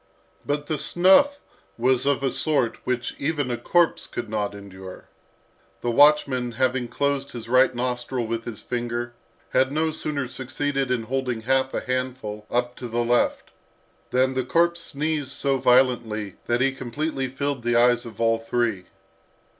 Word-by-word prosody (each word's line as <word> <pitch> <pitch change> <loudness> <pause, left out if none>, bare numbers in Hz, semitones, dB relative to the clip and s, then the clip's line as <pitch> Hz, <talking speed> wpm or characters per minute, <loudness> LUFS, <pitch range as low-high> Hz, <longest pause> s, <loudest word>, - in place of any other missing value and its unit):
But 145 0 -2
the 155 -1 -2
snuff 195 - +4 0.4
was 130 +2 +2
of 140 -1 +1
a 135 - +1
sort 140 -7 0
which 125 -1 -1
even 145 -3 -1
a - - 0
corpse 175 +4 +2
could - - -5
not 105 -2 -2
endure. 95 -2 -11 0.7
The 120 - 0
watchman 135 -3 +4
having 130 0 0
closed 140 +1 -1
his 115 -2 -7
right 130 +1 +4
nostril 125 0 -2
with 115 0 -3
his 115 -4 -7
finger, 120 0 -3 0.4
had 130 +1 +3
no 160 +2 +1
sooner 150 -3 -3
succeeded 135 +2 -2
in 125 -3 0
holding 125 -1 -2
half 130 +2 +1
a - - -1
handful 125 -5 -4
up 120 0 0
to 125 - -6
the 120 +1 -1
left, 120 +1 +1 0.6
than 130 +1 +2
the 130 0 0
corpse 170 +6 +2
sneezed 150 -2 -2
so 135 0 0
violently 120 -5 +2
that 120 +1 +1
he 135 +1 +3
completely 135 +2 -3
filled 140 0 -3
the 120 0 0
eyes 120 0 +4
of 115 -3 -11
all 115 -1 +2
three. 115 -4 -1
125 Hz, 160 wpm, -24 LUFS, 120-140 Hz, 0.7 s, snuff